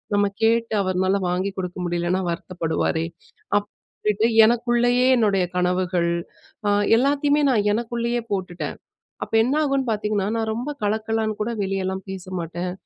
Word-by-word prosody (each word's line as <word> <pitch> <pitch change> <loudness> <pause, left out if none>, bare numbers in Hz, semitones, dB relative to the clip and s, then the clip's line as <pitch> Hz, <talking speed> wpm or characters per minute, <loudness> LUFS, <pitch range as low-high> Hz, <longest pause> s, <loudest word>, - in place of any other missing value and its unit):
நம்ம 205 0 +3 0.2
கேட்டு 230 0 +2
அவருனால 185 +1 +1
வாங்கி 185 +3 -1
கொடுக்க 180 -1 -4
முடியலனா 175 +2 0
வருத்தப்படுவாரே!" 165 -1 -1 0.5
அப்பிடிட்டு 210 +1 -3 0.2
எனக்குள்ளேயே 240 +2 +2
என்னுடைய 200 -5 +2
கனவுகள், 180 -1 +1 0.6
அ - - +3 0.3
எல்லாத்தையுமே 285 +3 +2
நான் 210 -4 +2
எனக்குள்ளேயே 235 +1 -1
போட்டுட்டேன், 185 -3 -3 0.5
அப்ப - - -10
என்ன 255 +5 0
ஆகுன்னு 275 -3 0
பார்த்த்தீங்கன்னா, 210 -2 -1
நான் 220 -1 -1
ரொம்ப 245 +5 -4
கலக்கலன்னு 220 0 -1
கூட 225 +3 -1
வெளியெல்லாம் 190 0 -2
பேச 190 -2 -7
மாட்டேன். 175 +2 -4
205 Hz, 125 wpm, -23 LUFS, 185-235 Hz, 0.6 s, நம்ம